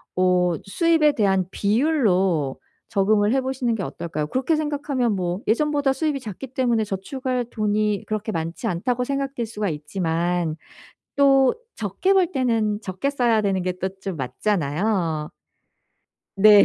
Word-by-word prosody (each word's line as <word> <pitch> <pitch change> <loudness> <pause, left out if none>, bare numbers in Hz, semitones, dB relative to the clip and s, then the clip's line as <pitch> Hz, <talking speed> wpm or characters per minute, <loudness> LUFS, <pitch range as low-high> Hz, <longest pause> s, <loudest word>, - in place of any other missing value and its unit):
어 180 -1 +3
수입에 320 - +3
대한 195 -6 +2
비율로 200 - +1 0.3
적응을 205 +2 +2
해 270 - +2
보시는 255 -3 -1
게 195 - -3
어떨까요? 155 -4 -4
그렇게 260 - 0
생각하면 285 -6 -1
뭐 180 +2 -2
예전보다 285 +3 +2
수입이 300 -2 -1
작기 230 +2 -7
때문에 240 -3 +1
저축할 250 +5 -3
돈이 210 -1 0
그렇게 215 0 -2
많지 165 0 -4
않다고 245 +8 -1
생각될 275 -2 -2
수가 210 -3 -3
있지만 165 +1 -1 0.6
또 270 -2 +5 0.2
적게 220 - 0
벌 380 -2 +4
때는 225 -5 +1
적게 190 +8 -2
써야 240 -6 +2
되는 195 -3 0
게 185 0 -1
또 190 - -1
좀 190 -4 -4
맞잖아요. 160 - -1 1.0
네. 205 0 +8
215 Hz, 295 characters per minute, -23 LUFS, 185-260 Hz, 1.0 s, 네